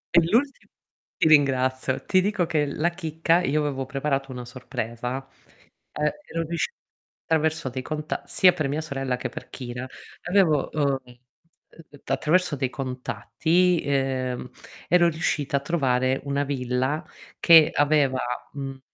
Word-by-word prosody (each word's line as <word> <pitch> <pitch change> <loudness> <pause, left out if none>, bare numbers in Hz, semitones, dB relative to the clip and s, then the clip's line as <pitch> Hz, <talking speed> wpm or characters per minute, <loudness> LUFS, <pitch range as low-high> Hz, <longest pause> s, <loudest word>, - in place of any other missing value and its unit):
E 170 - +8
l'ulti 270 +5 +1 0.5
ti - - +3
ringrazio, 130 -3 +2
ti 185 -1 +3
dico 190 -2 0
che 150 -3 0
la 155 +4 0
chicca, 165 0 +1
io 150 -3 +1
avevo 135 -3 -2
preparato 135 0 -2
una 125 -1 -6
sorpresa, 125 +1 -5 0.7
ehm, 150 0 0 0.2
ero 165 0 -2
riuscit 170 - -2 0.5
attraverso 160 -3 0
dei 130 +1 -5
conta 155 +3 -4
sia 180 -1 +5
per 150 -3 -1
mia 150 +3 -1
sorella 135 -4 -3
che - - -4
per - - -9
Kira 125 0 -6 0.4
avevo, 180 -7 +3
ehm, 140 -3 +1
uhm, 140 +5 -20
attraverso 165 0 +1
dei 135 -2 -1
contatti, 160 +7 0
ehm, 130 -3 -1 0.4
ero 175 -1 +5
riuscita 155 -3 -1
a - - -3
trovare 130 -4 +1
una 140 0 0
villa, 130 +2 -1 0.4
che 165 -3 +7
aveva 145 -3 +2 0.3
mhmm, 135 -1 -6
145 Hz, 135 wpm, -25 LUFS, 130-160 Hz, 0.7 s, E